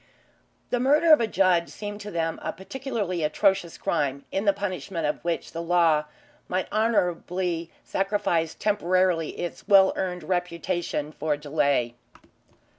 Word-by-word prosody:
The 245 - +1
murder 300 +5 +5
of 300 - +6
a 230 - +1
judge 180 -5 +2
seemed 205 0 -7
to 210 - -7
them 165 -3 -2
a - - -2
particularly 200 -3 -4
atrocious 175 +1 +1
crime, 140 -1 -1
in 195 +2 -1
the 200 - +6
punishment 190 -4 -4
of 150 - -2
which 170 -1 -2
the 165 - -4
law 165 -3 +3 0.4
might 185 +1 -1
honourably 180 -5 0
sacrifice 195 -5 0
temporarily 185 -5 +1
its 175 +2 -5
well 195 -2 +6
earned 180 -2 -3
reputation 175 -3 -2
for 155 -1 -1
delay. 140 -5 0
180 Hz, 135 wpm, -26 LUFS, 165-200 Hz, 0.4 s, of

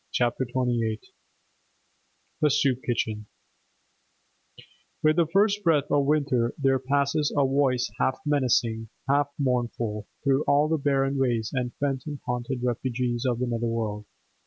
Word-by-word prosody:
CHAPTER 120 +1 0
XXVIII 120 -3 -1 1.4
THE 150 - +4
SOUP 135 -2 +2
KITCHEN 110 -3 -2 1.8
With 155 +1 +4
the 170 -2 +3
first 205 +2 +3
breath 155 -5 +2
of 145 -1 +3
winter 140 -6 +1
there 135 -2 +2
passes 140 +3 +1
a 140 - +4
voice 130 -2 +1
half 130 - +1
menacing, 120 -6 +1 0.2
half 140 +1 +3
mournful, 120 -5 -1 0.2
through 140 +1 +2
all 145 +2 +3
the 160 0 0
barren 135 -1 +1
ways 120 -4 0
and 125 -2 -2
phantom 140 +1 -3
haunted 125 +1 -3
refuges 125 0 -1
of 120 - 0
the 125 - -1
nether 120 -1 -2
world. 105 -2 -3
130 Hz, 135 wpm, -26 LUFS, 120-140 Hz, 1.8 s, THE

